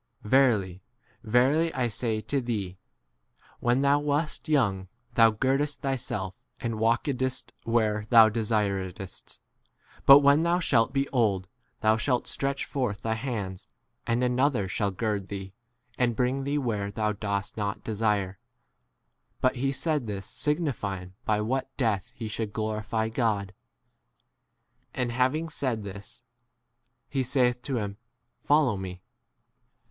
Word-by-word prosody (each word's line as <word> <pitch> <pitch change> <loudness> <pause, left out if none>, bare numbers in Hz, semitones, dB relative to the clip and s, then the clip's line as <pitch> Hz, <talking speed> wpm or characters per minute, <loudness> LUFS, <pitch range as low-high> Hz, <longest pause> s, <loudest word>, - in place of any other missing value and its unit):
Verily, 105 -7 +3 0.4
verily, 130 +9 +3
I 125 -2 +1
say 110 -1 -1
to 140 +4 -1
thee, 100 -6 -3 0.8
When 120 +2 +2
thou 140 +1 +4
wast 150 +2 -1
young 100 -11 +2 0.3
thou 115 -1 +6
girdedst 135 +6 0
thyself, 120 -8 -3 0.2
and 115 -2 -3
walkedst 130 +3 0
where 110 -2 +1
thou 115 -2 +8
desir 105 -3 0
edst; 95 0 -10 0.7
but 140 +1 +10
when 140 +2 +5
thou 170 +1 +2
shalt 125 -8 +2
be 135 +1 0
old, 100 -7 +1 0.3
thou 110 +1 +4
shalt 125 +2 0
stretch 140 0 -1
forth 120 -7 -2
thy 110 -1 0
hands, 110 -6 -4 0.4
and 120 +1 +1
another 125 -4 +2
shall 100 +2 0
gird 100 0 -2
thee, 95 -1 -6 0.5
and 120 -2 +2
bring 130 +3 0
thee 145 +1 0
where 110 -7 -1
thou 105 +1 -1
19 105 - -4
dost 100 -2 -2
not 100 -2 -3
desire. 105 -4 -1 1.0
But 130 0 +1
he 135 +2 0
said 150 -2 -1
this 100 -2 -4
signifying 105 - -2
by 105 -1 +1
what 130 +4 -2
death 110 -7 0
he 115 - -5
should 110 -1 -4
glorify 110 0 -2
God. 110 -4 -1 1.4
And 125 -2 -1
having 130 +7 +1
said 130 -8 -2
this, 100 0 -9 0.8
he 135 - -1
saith 125 -1 +1
to 130 -1 -2
him, 100 -2 -3 0.4
Follow 145 -6 +3
me. 95 -1 -7
115 Hz, 135 wpm, -27 LUFS, 105-135 Hz, 1.4 s, but